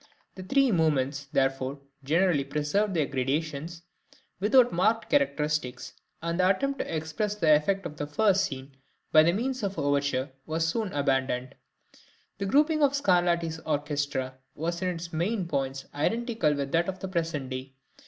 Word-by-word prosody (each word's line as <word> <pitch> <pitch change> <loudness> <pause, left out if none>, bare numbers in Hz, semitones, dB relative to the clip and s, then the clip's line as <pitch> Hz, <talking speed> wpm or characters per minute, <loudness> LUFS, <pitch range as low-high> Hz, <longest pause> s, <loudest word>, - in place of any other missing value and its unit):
The 190 - -9
three 270 +6 +2
movements, 145 -5 +1
therefore, 135 +1 0 0.3
generally 165 +1 +2
preserved 150 +8 0
their 155 -3 +2
gradations 150 +5 -3 0.6
without 245 +5 +4
marked 215 +6 +1
characteristics, 150 - 0 0.3
and 170 +1 -2
the 185 0 +4
attempt 275 +8 0
to - - -3
express 160 +7 -2
the 160 -7 +4
effect 195 +6 +1
of 150 - -6
the 145 - -3
first 200 +4 +3
scene 135 -4 -7 0.4
by 155 +2 +6
means 255 +7 -2
of 200 -2 -2
the - - -2
overture 140 -2 0 0.2
was 160 +1 0
soon 215 +3 -1
abandoned. 135 -3 0 0.9
The 200 - -2
grouping 305 +7 +3
of 285 -1 +4
Scarlatti's 175 - +1
orchestra 145 -4 -2 0.2
was 170 +3 -3
in 185 - 0
its 170 -1 -4
main 180 +3 -1
points 135 -3 -2
identical 220 - 0
with 140 -1 -3
that 170 +2 +2
of 190 - -4
the 190 - -5
present 165 -7 -2
day. 130 +1 -6
160 Hz, 155 wpm, -28 LUFS, 140-195 Hz, 0.9 s, by